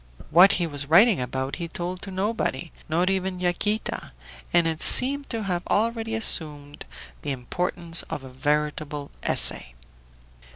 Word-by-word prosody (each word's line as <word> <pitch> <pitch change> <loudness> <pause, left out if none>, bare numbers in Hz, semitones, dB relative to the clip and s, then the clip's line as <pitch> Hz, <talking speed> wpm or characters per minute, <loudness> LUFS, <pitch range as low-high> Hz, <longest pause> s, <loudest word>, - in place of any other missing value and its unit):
What 180 +5 +7
he 175 - 0
was 145 -3 -5
writing 185 - +5
about 130 +2 -4
he 170 -2 -5
told 175 +2 -5
to 200 - -6
nobody, 190 -6 -3 0.2
not 170 +3 0
even 190 -1 -3
Yaquita, 185 +4 -2 0.4
and 175 -1 +3
it 160 -1 -2
seemed 280 +2 +6
to 225 -2 -3
have 180 -3 -2
already 225 +1 -1
assumed 150 -9 -1 0.4
the 145 - -6
importance 165 +6 -1
of 135 - -6
a 130 - -10
veritable 150 +2 -3
essay. - - 0
175 Hz, 140 wpm, -24 LUFS, 145-195 Hz, 0.4 s, What